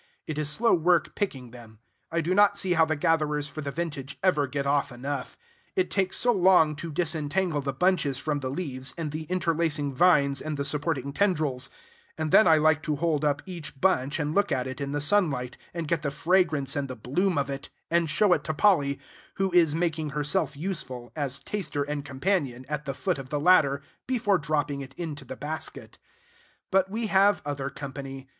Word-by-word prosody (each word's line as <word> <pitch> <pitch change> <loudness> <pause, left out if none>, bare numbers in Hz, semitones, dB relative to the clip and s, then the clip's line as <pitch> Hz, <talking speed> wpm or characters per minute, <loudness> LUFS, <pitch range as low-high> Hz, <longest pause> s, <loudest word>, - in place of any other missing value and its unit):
It 155 -1 -4
is 150 -1 0
slow 230 +10 +2
work 175 0 +2
picking 130 - -3
them. 115 -3 -13 0.3
I 170 0 +1
do 170 +3 0
not 205 +1 +5
see 190 -3 +1
how 165 -2 +4
the 155 0 -1
gatherers 150 -2 +1
for 155 - -7
the 145 - -4
vintage 145 -3 -5
ever 150 -7 +3
get 140 +1 -3
off 140 0 +1
enough. 130 +2 -5 0.4
It 185 -1 +1
takes 190 -1 0
so 245 - +3
long 180 -6 +4
to 165 +2 -6
disentangle 160 +1 0
the 140 0 -2
bunches 165 -6 +1
from 145 +1 -2
the 130 -2 -3
leaves 135 -4 -4
and 160 -3 -3
the 155 +1 -5
interlacing 165 -4 0
vines 140 -3 +3
and 155 -1 -4
the 140 - -2
supporting 140 -1 -1
tendrils; 150 -9 0 0.5
and 155 -1 -2
then 215 - +7
I 160 -1 +6
like 155 0 +3
to 155 -2 -1
hold 155 -1 0
up 145 -1 +1
each 170 -7 -8
bunch 145 -7 +2
and 150 0 -1
look 200 +3 +2
at 125 - 0
it 130 +1 -6
in 140 0 -3
the 145 0 -1
sunlight, 145 -8 +1 0.2
and 170 -2 -4
get 165 0 0
the 150 - -1
fragrance 160 -2 +1
and 140 -1 -1
the 130 - -6
bloom 150 - 0
of 140 0 0
it, 135 0 -6 0.2
and 170 -1 +2
show 180 +6 +4
it 150 - 0
to 155 - -2
Polly, 145 -8 +3 0.4
who 195 -1 0
is 165 -4 +4
making 160 -2 -1
herself 150 -1 0
useful, 130 - -4
as 140 -3 -3
taster 165 -8 -3
and 145 0 -4
companion, 140 -3 -1
at 150 0 -4
the 135 -1 -3
foot 180 -3 -1
of 130 -1 -8
the 145 - -1
ladder, 140 -4 +4 0.2
before 215 -7 +2
dropping 150 -2 -1
it 135 0 -10
into 160 -4 -5
the - - -7
basket. 155 +2 -6 0.7
But 190 0 +3
we 225 +3 -2
have 200 -3 +3
other 140 -1 -3
company. 135 -1 -7
150 Hz, 200 wpm, -27 LUFS, 140-175 Hz, 0.7 s, then